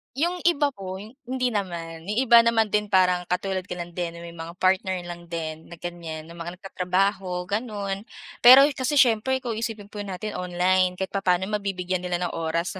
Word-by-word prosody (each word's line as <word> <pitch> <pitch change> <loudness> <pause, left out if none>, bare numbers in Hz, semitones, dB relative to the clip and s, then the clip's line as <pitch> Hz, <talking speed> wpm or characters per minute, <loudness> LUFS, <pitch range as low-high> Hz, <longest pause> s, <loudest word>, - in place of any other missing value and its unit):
Yung 345 +5 0
iba 290 -4 +3
po 190 -4 -7 0.3
hindi 255 -1 0
naman, 170 -4 -4
yung 210 - -2
iba 235 -2 +8
naman 225 -2 +3
din 210 0 +1
parang 180 -2 +3
katulad 185 +1 -2
ko - - -5
lang 175 0 -6
din 170 -1 -4
na 170 - -9
may 170 - -8
mga 170 +1 -8
partner 190 0 +2
lang 175 0 -9
din 160 -1 -5
na 170 - -10
ganyan 170 -2 -6
na 165 - -13
mga 170 +1 -7
nag-tatrabaho 185 -1 -1
ganon. 205 -1 -3 0.4
Pero 260 +3 +10
kasi 270 +2 -1
siyempre 260 +1 +3
ikaw 240 - -2
isipin 220 -2 -4
po 210 - -7
natin 205 +1 -5
online 180 +1 +2
kahit 190 +1 -4
papaano 190 0 +1
mabibigyan 185 -2 -2
nila 180 -1 -2
ng 175 - -2
oras 165 +4 -2
185 Hz, 190 wpm, -25 LUFS, 175-210 Hz, 0.4 s, Pero